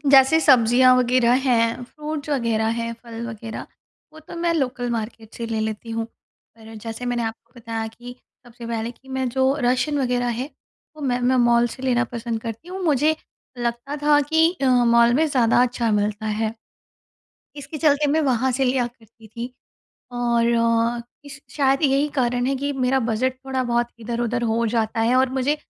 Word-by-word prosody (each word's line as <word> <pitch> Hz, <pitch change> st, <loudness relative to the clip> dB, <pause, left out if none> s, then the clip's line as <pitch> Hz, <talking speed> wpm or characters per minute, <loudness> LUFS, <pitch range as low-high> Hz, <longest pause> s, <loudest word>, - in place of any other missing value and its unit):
जैसे 270 Hz, +3 st, +7 dB
सब्जियाँ 255 Hz, -2 st, +5 dB
वगैरह 250 Hz, -1 st, +3 dB
हैं, 230 Hz, -2 st, +2 dB
फ्रूट्स 300 Hz, +3 st, -6 dB
वगैरह 230 Hz, -5 st, 0 dB
हैं, 230 Hz, 0 st, -3 dB
फल 235 Hz, -1 st, -7 dB
वगैरह 225 Hz, -1 st, -7 dB, 0.5 s
वो 315 Hz, -, -13 dB
तो 315 Hz, -, -11 dB
मैं 340 Hz, 0 st, +1 dB
लोकल 250 Hz, -4 st, -1 dB
मार्केट 225 Hz, -1 st, -5 dB
से 235 Hz, -, -5 dB
ले 225 Hz, -1 st, -2 dB
लेती 220 Hz, +1 st, -4 dB
हूँ। 225 Hz, 0 st, -2 dB, 0.5 s
पर 225 Hz, 0 st, -13 dB
जैसे 225 Hz, +2 st, -6 dB
मैंने 245 Hz, -1 st, -1 dB
आपको 225 Hz, +1 st, -6 dB
बताया 225 Hz, -1 st, -4 dB
कि 240 Hz, +2 st, -10 dB, 0.3 s
सबसे 235 Hz, 0 st, -11 dB
पहले 230 Hz, 0 st, -3 dB
कि 265 Hz, +2 st, -19 dB
मैं 265 Hz, -1 st, -2 dB
जो 265 Hz, +2 st, +2 dB
राशन 255 Hz, +4 st, +1 dB
वगैरह 245 Hz, -2 st, 0 dB
है, 245 Hz, +5 st, -3 dB, 0.5 s
वो 305 Hz, -, -9 dB
मैं 250 Hz, -3 st, 0 dB
मैं 255 Hz, +1 st, +2 dB
मॉल 240 Hz, -1 st, +4 dB
से 255 Hz, -, -10 dB
लेना 250 Hz, -1 st, +2 dB
पसंद 235 Hz, -1 st, -3 dB
करती 230 Hz, +9 st, -7 dB
हूँ। 380 Hz, +1 st, -6 dB
मुझे 310 Hz, 0 st, +2 dB, 0.4 s
लगता 240 Hz, +4 st, -3 dB
था 295 Hz, 0 st, +5 dB
कि 320 Hz, +3 st, +3 dB
अ, -, -, +3 dB, 0.2 s
मॉल 235 Hz, 0 st, +5 dB
में 315 Hz, +5 st, +3 dB
ज़्यादा 245 Hz, -4 st, +3 dB
अच्छा 240 Hz, -2 st, 0 dB
मिलता 210 Hz, +1 st, -1 dB
है। 215 Hz, +1 st, -1 dB, 1.0 s
इसके 285 Hz, +2 st, -7 dB
चलते 295 Hz, -1 st, +3 dB
मैं 315 Hz, -, +2 dB
वहाँ 260 Hz, -2 st, +1 dB
से 265 Hz, +2 st, 0 dB
लिया 250 Hz, -1 st, +1 dB
करती 225 Hz, -1 st, -19 dB
थी। 235 Hz, +3 st, -7 dB, 0.6 s
और 235 Hz, -1 st, +1 dB
अ, 230 Hz, 0 st, +1 dB, 0.2 s
इस 275 Hz, -1 st, -11 dB
शायद 275 Hz, 0 st, +2 dB
यही 280 Hz, +1 st, +3 dB
कारण 245 Hz, 0 st, +1 dB
है 270 Hz, +1 st, 0 dB
कि 285 Hz, +2 st, -2 dB
मेरा 265 Hz, 0 st, +1 dB
बजट 250 Hz, +4 st, 0 dB
थोड़ा 265 Hz, -1 st, -1 dB
बहुत 240 Hz, -1 st, 0 dB
इधर-उधर 235 Hz, +1 st, -2 dB
हो 230 Hz, +1 st, +1 dB
जाता 225 Hz, -1 st, 0 dB
है 235 Hz, +3 st, +2 dB
और 260 Hz, 0 st, +3 dB
मुझे 290 Hz, +4 st, +1 dB
245 Hz, 180 wpm, -22 LUFS, 230-265 Hz, 1.0 s, जैसे